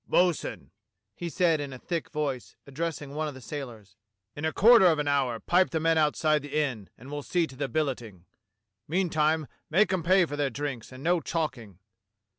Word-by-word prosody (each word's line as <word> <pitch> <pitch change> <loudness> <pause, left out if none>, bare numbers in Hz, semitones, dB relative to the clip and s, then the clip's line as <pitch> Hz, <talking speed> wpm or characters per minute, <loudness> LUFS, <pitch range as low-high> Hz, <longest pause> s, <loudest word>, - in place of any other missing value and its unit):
"Bo'sun," 175 -3 +1 0.4
he 170 +9 -5
said 165 -2 +2
in 140 -1 -5
a 130 - -7
thick 165 +5 -4
voice, 145 -5 -3
addressing 145 0 -4
one 155 +1 -2
of 145 - -6
the - - -9
sailors, 115 -7 -8 0.4
"in 145 - -4
a 160 - +1
quarter 225 0 +7
of 165 -3 +4
an 150 -1 -1
hour 135 -5 +1
pipe 180 +8 +3
the 160 - -1
men 165 +1 +2
out 150 -2 +2
side 155 -2 +2
the 145 +2 -2
inn, 125 -10 -2
and 130 +4 -12
we'll 145 0 -4
see 175 +4 +1
to 130 - -12
the 135 0 -3
billeting. 120 - -3 0.6
Meantime 160 -2 +1 0.2
make 190 +4 +3
'em 185 - 0
pay 185 +2 +4
for 145 - -5
their 145 -1 0
drinks 135 -2 -5
and 130 +1 -10
no 175 +1 +2
chalking. 125 - -3
150 Hz, 200 wpm, -28 LUFS, 135-165 Hz, 0.6 s, quarter